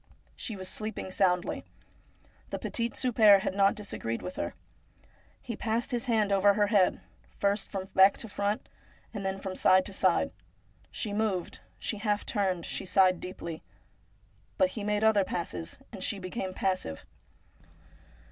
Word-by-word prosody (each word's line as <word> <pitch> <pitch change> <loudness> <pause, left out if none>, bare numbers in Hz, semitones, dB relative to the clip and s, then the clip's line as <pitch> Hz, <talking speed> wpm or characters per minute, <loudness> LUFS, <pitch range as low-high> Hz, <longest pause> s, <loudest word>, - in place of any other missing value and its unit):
She 220 - -5
was 185 -1 -5
sleeping 215 -2 -4
soundly. 180 -2 +1 0.9
The - - -3
petit 235 0 -2
souper 215 -5 +6
had 190 - -2
not 195 +1 +4
disagreed 160 - -4
with 180 - -6
her. - - -3 0.9
He 235 - -4
passed 230 +4 -1
his 245 +1 -1
hand 220 -4 +2
over 200 +1 +5
her 205 0 +3
head, 190 -3 +4 0.4
first 200 0 0
from 190 -1 -4
back 190 +1 +6
to 230 - -6
front, 205 0 -2 0.5
and 205 -2 -4
then 190 0 -1
from 190 -1 -5
side 185 0 +5
to 200 - -4
side. 190 +9 +2 0.6
She 210 -3 -3
moved, 205 -4 -1 0.2
she 215 - -3
half 210 -1 0
turned, 190 -5 0
she - - -2
sighed 185 -1 +4
deeply; 170 -3 -6 1.0
but 280 - +4
he 220 -6 -6
made 210 +1 0
other 220 -2 +5
passes, 90 - -4
and - - -6
she 205 - 0
became 190 +1 -4
passive. 185 - -2
200 Hz, 155 wpm, -29 LUFS, 185-215 Hz, 1.0 s, souper